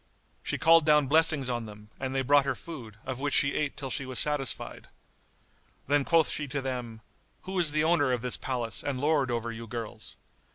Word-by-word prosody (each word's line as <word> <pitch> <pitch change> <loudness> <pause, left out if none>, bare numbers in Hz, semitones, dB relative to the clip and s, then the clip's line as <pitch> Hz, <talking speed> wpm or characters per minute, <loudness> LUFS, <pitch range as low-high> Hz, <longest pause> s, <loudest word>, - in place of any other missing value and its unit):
She - - -2
called 165 +1 +6
down 150 -1 +4
blessings 155 -1 +3
on 120 -3 -3
them 105 0 -13
and 130 0 -3
they 135 - +1
brought 145 +2 +5
her 135 - -1
food, 120 -11 -10
of 130 -1 -4
which 140 0 0
she 140 - +3
ate 150 -2 -2
till 135 -2 -5
she 135 - -1
was 130 -1 -6
satisfied. 150 -3 0 1.0
Then 145 0 +2
quoth 165 -2 +3
she 150 - -3
to 140 +1 -3
them, 125 -4 -5 0.4
"Who 190 0 -3
is 165 -4 +2
the 150 0 +1
owner 160 -5 +3
of 125 -1 -1
this 125 - 0
palace 120 -4 -3
and 140 -3 -2
lord 145 -2 +1
over 115 -1 -2
you 115 0 -8
girls?" 115 -1 -7
135 Hz, 205 wpm, -28 LUFS, 120-150 Hz, 1.0 s, called